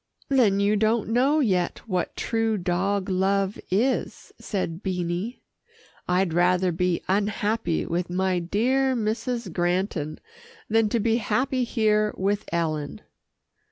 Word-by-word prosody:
"Then 230 Hz, -8 st, +3 dB
you 200 Hz, +1 st, +3 dB
don't 220 Hz, +1 st, +1 dB
know 270 Hz, +7 st, +3 dB
yet 185 Hz, -4 st, 0 dB
what 185 Hz, -4 st, -2 dB
true 225 Hz, -1 st, 0 dB
dog 185 Hz, +2 st, 0 dB
love 195 Hz, +1 st, 0 dB
is," 240 Hz, +8 st, -1 dB
said 185 Hz, -4 st, -3 dB
Beanie. 180 Hz, +4 st, -3 dB, 0.7 s
"I'd 180 Hz, -1 st, +1 dB
rather 180 Hz, +1 st, +3 dB
be 175 Hz, +1 st, 0 dB
unhappy 205 Hz, -1 st, 0 dB
with 175 Hz, +1 st, -2 dB
my 185 Hz, 0 st, 0 dB
dear 255 Hz, +9 st, +1 dB
Mrs. 230 Hz, -2 st, -2 dB
Granton 175 Hz, -3 st, -1 dB, 0.5 s
than 225 Hz, 0 st, +2 dB
to 235 Hz, -, +1 dB
be 225 Hz, +1 st, +2 dB
happy 250 Hz, +4 st, 0 dB
here 215 Hz, -3 st, +1 dB
with 200 Hz, +2 st, 0 dB
Ellen." 155 Hz, -4 st, -2 dB
200 Hz, 125 wpm, -25 LUFS, 180-225 Hz, 0.7 s, Then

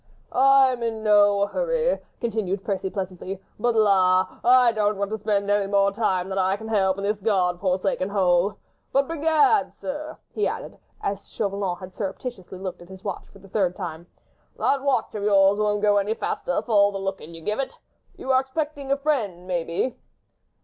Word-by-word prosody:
"I 270 Hz, 0 st, +5 dB
am 245 Hz, -1 st, -5 dB
in 225 Hz, -2 st, -2 dB
no 205 Hz, -1 st, +5 dB
hurry," -, -, 0 dB, 0.2 s
continued 205 Hz, -5 st, -2 dB
Percy, 195 Hz, -2 st, -2 dB
pleasantly, 185 Hz, 0 st, -5 dB, 0.2 s
"but, 240 Hz, +1 st, +1 dB
la! 190 Hz, -4 st, +3 dB
I 250 Hz, -1 st, +6 dB
don't 210 Hz, -2 st, 0 dB
want 200 Hz, +1 st, -2 dB
to 220 Hz, -, -3 dB
spend 200 Hz, -1 st, 0 dB
any 205 Hz, -1 st, +2 dB
more 200 Hz, 0 st, +3 dB
time 190 Hz, -4 st, 0 dB
than 195 Hz, 0 st, -2 dB
I 190 Hz, +1 st, +1 dB
can 220 Hz, +1 st, -8 dB
help 190 Hz, -3 st, +2 dB
in 200 Hz, -, -5 dB
this 205 Hz, +1 st, 0 dB
God 185 Hz, -4 st, +1 dB
forsaken 185 Hz, 0 st, 0 dB
hole! 190 Hz, 0 st, +2 dB, 0.3 s
But, 275 Hz, 0 st, +2 dB
begad! 320 Hz, +6 st, +2 dB
sir," 300 Hz, +2 st, -5 dB, 0.2 s
he 425 Hz, -, +1 dB
added, -, -, -6 dB, 0.2 s
as 200 Hz, 0 st, -3 dB
Chauvelin 200 Hz, -4 st, -2 dB
had 185 Hz, +1 st, -10 dB
surreptitiously 195 Hz, -1 st, -6 dB
looked 185 Hz, -2 st, -6 dB
at 175 Hz, -, -14 dB
his 190 Hz, 0 st, -12 dB
watch 195 Hz, -3 st, -5 dB
for -, -, -17 dB
the 195 Hz, -, -16 dB
third 185 Hz, -3 st, 0 dB
time, 170 Hz, -3 st, -6 dB, 0.5 s
"that 275 Hz, -, +1 dB
watch 265 Hz, -4 st, 0 dB
of 210 Hz, -, -4 dB
yours 200 Hz, 0 st, +4 dB
won't 210 Hz, 0 st, 0 dB
go 205 Hz, -1 st, +4 dB
any 205 Hz, +2 st, 0 dB
faster -, -, -2 dB
for 240 Hz, -, -7 dB
all 205 Hz, -1 st, +5 dB
the 200 Hz, -, -4 dB
looking 195 Hz, -4 st, -5 dB
you 165 Hz, -, -10 dB
give 210 Hz, +6 st, -2 dB
it. 270 Hz, -, -3 dB, 0.4 s
You 265 Hz, -, -2 dB
are 260 Hz, 0 st, +5 dB
expecting 285 Hz, 0 st, -4 dB
a 275 Hz, -, +3 dB
friend, 230 Hz, -, -1 dB
maybe?" 175 Hz, +6 st, -2 dB
205 Hz, 190 wpm, -24 LUFS, 190-240 Hz, 0.5 s, I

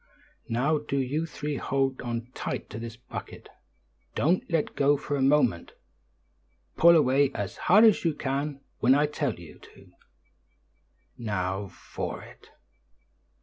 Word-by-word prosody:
"Now 140 Hz, +7 st, +1 dB
do 145 Hz, -1 st, -3 dB
you 145 Hz, +5 st, -1 dB
three 150 Hz, -2 st, -4 dB
hold 135 Hz, 0 st, -1 dB
on 120 Hz, 0 st, -4 dB
tight -, -, -5 dB
to 110 Hz, -, -6 dB
this 115 Hz, 0 st, -7 dB
bucket; 120 Hz, -, -9 dB, 0.7 s
don't 175 Hz, +5 st, +2 dB
let 165 Hz, -4 st, 0 dB
go 145 Hz, +1 st, +3 dB
for 145 Hz, -, -3 dB
a 140 Hz, -, -1 dB
moment; 130 Hz, -10 st, +2 dB, 1.0 s
pull 170 Hz, +1 st, +7 dB
away 140 Hz, -2 st, +4 dB
as 100 Hz, -3 st, -4 dB
hard 210 Hz, +6 st, +8 dB
as 220 Hz, -3 st, +5 dB
you 165 Hz, -3 st, +1 dB
can 140 Hz, 0 st, -3 dB, 0.2 s
when 130 Hz, +2 st, +5 dB
I 145 Hz, +1 st, +4 dB
tell 145 Hz, -5 st, -2 dB
you 85 Hz, -3 st, -13 dB
to. -, -, -18 dB, 1.3 s
Now 100 Hz, -3 st, -2 dB
for 85 Hz, -, -6 dB
it!" -, -, -16 dB
135 Hz, 140 wpm, -27 LUFS, 115-150 Hz, 1.3 s, hard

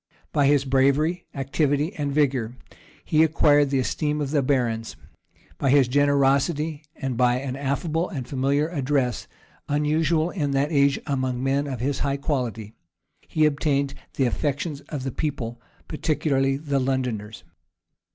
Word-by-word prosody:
By 145 Hz, -2 st, +3 dB
his 140 Hz, -1 st, +3 dB
bravery, 140 Hz, +6 st, +2 dB
activity, 145 Hz, +4 st, 0 dB
and 145 Hz, -2 st, -3 dB
vigor, 130 Hz, -5 st, +1 dB, 0.5 s
he 155 Hz, -, +3 dB
acquired 145 Hz, -2 st, +4 dB
the 135 Hz, -, +1 dB
esteem 150 Hz, +3 st, -1 dB
of 140 Hz, -2 st, -2 dB
the 150 Hz, -2 st, +2 dB
barons; 120 Hz, -5 st, -1 dB, 0.6 s
by 135 Hz, -, +1 dB
his 135 Hz, -2 st, +5 dB
generosity, 145 Hz, +3 st, +2 dB
and 135 Hz, -2 st, -3 dB
by 125 Hz, 0 st, +3 dB
an 130 Hz, 0 st, -3 dB
affable 150 Hz, +5 st, -1 dB
and 135 Hz, -, -5 dB
familiar 140 Hz, +3 st, +1 dB
address, 135 Hz, -6 st, -1 dB, 0.4 s
unusual 155 Hz, +3 st, +1 dB
in 150 Hz, -7 st, -1 dB
that 140 Hz, +3 st, +1 dB
age 140 Hz, -2 st, +3 dB
among 130 Hz, -3 st, -1 dB
men 140 Hz, +2 st, +1 dB
of 130 Hz, -4 st, -4 dB
his 135 Hz, +1 st, -1 dB
high 140 Hz, -1 st, 0 dB
quality, 120 Hz, -7 st, -3 dB, 0.5 s
he 155 Hz, -1 st, +2 dB
obtained 140 Hz, -2 st, +1 dB, 0.2 s
the 135 Hz, -, +2 dB
affections 145 Hz, +3 st, -2 dB
of 145 Hz, -4 st, -4 dB
the 135 Hz, -, -3 dB
people, 120 Hz, -5 st, -4 dB, 0.3 s
particularly 145 Hz, -3 st, 0 dB
of 145 Hz, +3 st, -9 dB
the 140 Hz, -2 st, +1 dB
Londoners. 125 Hz, -5 st, -2 dB
140 Hz, 145 wpm, -24 LUFS, 130-150 Hz, 0.6 s, his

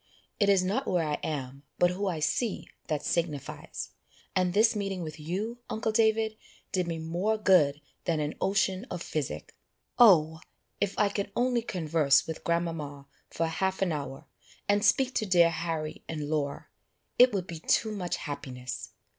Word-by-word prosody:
"It 205 Hz, -2 st, +4 dB
is 195 Hz, -2 st, +5 dB
not 215 Hz, +9 st, -1 dB
where 175 Hz, -4 st, +1 dB
I 150 Hz, -, -1 dB
am, 140 Hz, -3 st, -4 dB, 0.2 s
but 175 Hz, 0 st, +4 dB
who 195 Hz, +3 st, -2 dB
I 175 Hz, -4 st, -1 dB
see, 215 Hz, +8 st, -1 dB, 0.2 s
that 150 Hz, -3 st, -2 dB
signifies; 160 Hz, -5 st, -3 dB, 0.4 s
and 185 Hz, -1 st, +2 dB
this 220 Hz, +4 st, +4 dB
meeting 195 Hz, -3 st, -2 dB
with 155 Hz, -1 st, -7 dB
you, 200 Hz, +10 st, -3 dB
uncle 220 Hz, 0 st, -1 dB
David, 220 Hz, 0 st, +2 dB, 0.3 s
did 180 Hz, -2 st, 0 dB
me 165 Hz, -1 st, -2 dB
more 175 Hz, +7 st, 0 dB
good 170 Hz, -9 st, +4 dB, 0.3 s
than 165 Hz, -3 st, +1 dB
an 150 Hz, 0 st, -1 dB
ocean 195 Hz, +2 st, +1 dB
of -, -, -4 dB
physic. -, -, -4 dB, 0.4 s
Oh! 160 Hz, -9 st, +6 dB, 0.4 s
if 200 Hz, -1 st, -1 dB
I 205 Hz, -, +3 dB
could 200 Hz, 0 st, -3 dB
only 245 Hz, -1 st, +2 dB
converse 165 Hz, -9 st, +2 dB
with 160 Hz, -, -6 dB
grandmama 165 Hz, -5 st, -2 dB, 0.2 s
for 165 Hz, -, -1 dB
half 190 Hz, +4 st, 0 dB
an 180 Hz, -, 0 dB
hour, 140 Hz, -3 st, -5 dB, 0.4 s
and 205 Hz, 0 st, +3 dB
speak 265 Hz, -1 st, +3 dB
to 215 Hz, -, 0 dB
dear 170 Hz, -3 st, +5 dB
Harry 160 Hz, -2 st, -3 dB
and 150 Hz, -2 st, -3 dB
Laura, 145 Hz, -2 st, -2 dB, 0.5 s
it 250 Hz, +1 st, +8 dB
would 195 Hz, -4 st, -1 dB
be 170 Hz, -3 st, -7 dB
too 215 Hz, +6 st, +2 dB
much 185 Hz, -4 st, -2 dB
happiness. 130 Hz, -4 st, -6 dB
175 Hz, 165 wpm, -29 LUFS, 155-205 Hz, 0.5 s, it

